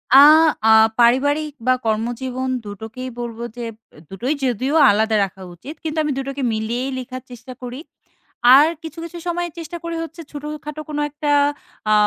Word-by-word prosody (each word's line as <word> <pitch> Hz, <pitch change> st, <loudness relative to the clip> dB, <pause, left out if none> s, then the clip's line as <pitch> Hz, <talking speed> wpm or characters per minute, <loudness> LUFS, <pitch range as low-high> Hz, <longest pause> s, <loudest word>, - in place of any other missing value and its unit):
আ -, -, +11 dB, 0.5 s
আ -, -, +6 dB, 0.3 s
পারিবারিক 285 Hz, +6 st, +3 dB, 0.2 s
বা 255 Hz, -, +6 dB
কর্মজীবন 245 Hz, +4 st, -2 dB
২ 205 Hz, -, -8 dB
টোকেই 255 Hz, +4 st, -6 dB
বলব 235 Hz, -1 st, -5 dB, 0.2 s
যে, -, -, -5 dB, 0.5 s
২ -, -, -11 dB
টোই 265 Hz, +5 st, +1 dB
যদিও 255 Hz, +4 st, 0 dB, 0.2 s
আলাদা 220 Hz, +1 st, +1 dB
রাখা 190 Hz, 0 st, -12 dB
উচিত। 275 Hz, -, -9 dB
কিন্তু 315 Hz, 0 st, -4 dB
আমি 300 Hz, -, -1 dB
২ -, -, 0 dB
টোকে 275 Hz, 0 st, -4 dB
মিলিয়েই 235 Hz, +4 st, -2 dB
লিখার 255 Hz, 0 st, -7 dB
চেষ্টা 245 Hz, +1 st, -10 dB
করি। 250 Hz, +2 st, -6 dB, 0.8 s
আর 295 Hz, +3 st, +7 dB, 0.2 s
কিছু, 320 Hz, 0 st, -8 dB
কিছু 335 Hz, +1 st, -8 dB
সময় 345 Hz, 0 st, -1 dB
চেষ্টা 335 Hz, +1 st, -6 dB
করি 335 Hz, 0 st, -4 dB
হচ্ছে, 330 Hz, +1 st, -9 dB
ছোটোখাটো 300 Hz, +1 st, -6 dB
কোনো 295 Hz, -1 st, -2 dB
একটা 295 Hz, 0 st, -4 dB, 0.6 s
আ -, -, +6 dB
260 Hz, 170 wpm, -20 LUFS, 240-300 Hz, 0.8 s, আ